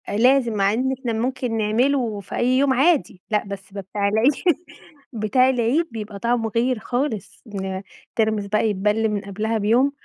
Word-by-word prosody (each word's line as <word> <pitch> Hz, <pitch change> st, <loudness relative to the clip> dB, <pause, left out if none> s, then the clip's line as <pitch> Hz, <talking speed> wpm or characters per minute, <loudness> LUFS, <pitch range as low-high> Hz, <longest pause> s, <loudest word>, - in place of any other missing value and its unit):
آآ، 205 Hz, -, -1 dB
لازم 250 Hz, 0 st, +4 dB
مع 200 Hz, -1 st, +2 dB
إن 255 Hz, +4 st, 0 dB
إحنا 245 Hz, -4 st, -2 dB
ممكن 240 Hz, 0 st, -2 dB
نعملوا 225 Hz, 0 st, +1 dB
في 190 Hz, -, -8 dB
أي 240 Hz, -, +1 dB
يوم 275 Hz, 0 st, +3 dB
عادي، 265 Hz, -, +2 dB
لأ 210 Hz, -, +2 dB
بس 195 Hz, -1 st, -8 dB
ده 200 Hz, -, -4 dB
بتاع 200 Hz, +1 st, -2 dB
العيد 220 Hz, +7 st, +4 dB, 0.8 s
بتاع 230 Hz, +4 st, +3 dB
العيد 260 Hz, +6 st, +1 dB
بيبقى 210 Hz, -2 st, -6 dB
طعمه 235 Hz, 0 st, 0 dB
غير 245 Hz, 0 st, +1 dB
خالص 245 Hz, -3 st, -3 dB
إن 190 Hz, -2 st, -4 dB, 0.3 s
الترمس 215 Hz, -2 st, 0 dB
بقى 215 Hz, +2 st, +1 dB
يتبل 210 Hz, +2 st, +1 dB
من 210 Hz, -1 st, -2 dB
قبلها 215 Hz, +3 st, -2 dB
بيوم، 235 Hz, +7 st, +3 dB
220 Hz, 175 wpm, -22 LUFS, 205-250 Hz, 0.8 s, لازم